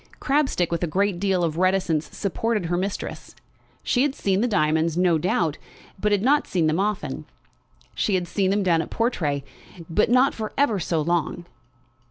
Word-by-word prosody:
Crabstick, 270 - +1
with 170 0 -1
a - - +1
good 190 +2 0
deal 190 -2 +1
of 165 0 -1
reticence, 180 -5 +1
supported 210 0 -1
her 175 +1 -1
mistress. 190 +3 -4 0.5
She 245 - +1
had 285 0 +1
seen 195 0 0
the 245 - +2
diamonds, 160 -4 +1
no 175 -3 +3
doubt, 165 -2 0 0.4
but 210 +2 0
had 205 -1 +2
not 290 +4 +3
seen 175 -4 0
them 155 +3 +1
often. 210 0 -2 0.7
She 205 - 0
had 180 -1 -1
seen 190 +1 0
them 200 +1 +1
down 170 -3 +3
at - - -7
Portray, 155 - -1 0.5
but 210 +7 +2
not 255 +3 +4
for 215 -1 -5
ever 250 -8 +2
so 165 -1 -1
long. 170 +1 -1
185 Hz, 180 wpm, -24 LUFS, 165-210 Hz, 0.7 s, not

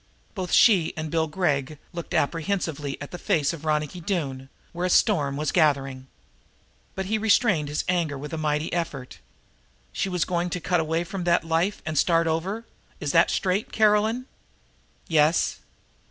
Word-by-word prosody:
Both 185 -4 -4
she 190 -9 +5
and 155 -1 -4
Bill 160 -1 +1
Gregg 150 -4 -1 0.2
looked 170 -1 -5
apprehensively 160 -3 -1
at 145 - -8
the 175 - -7
dark - - -20
face 155 -1 +2
of 160 -1 -9
Ronicky 150 +3 -1
Doone, 140 -8 -3 0.2
where 175 +1 -1
a - - -2
storm 145 -8 +2
was 150 0 -1
gathering. 135 -5 +1 0.9
But 190 - -3
he 215 +3 0
restrained 205 - +2
his 145 - -1
anger 170 -5 0
with 150 +3 -7
a - - -2
mighty 150 0 -1
effort. 150 -7 -4 0.7
"She 195 - -1
was 180 -3 0
going 175 0 -1
to 180 - -3
cut 175 +1 +1
away 160 +1 0
from 180 +1 -5
that 170 -1 +3
life 165 +5 0
and 155 -3 0
start 165 -1 +3
over 185 +8 -2 0.3
is 145 - -2
that - - +5
straight, 190 +2 0
Caroline?" 220 +3 +2 0.8
"Yes." 155 0 +2
165 Hz, 170 wpm, -25 LUFS, 150-185 Hz, 0.9 s, she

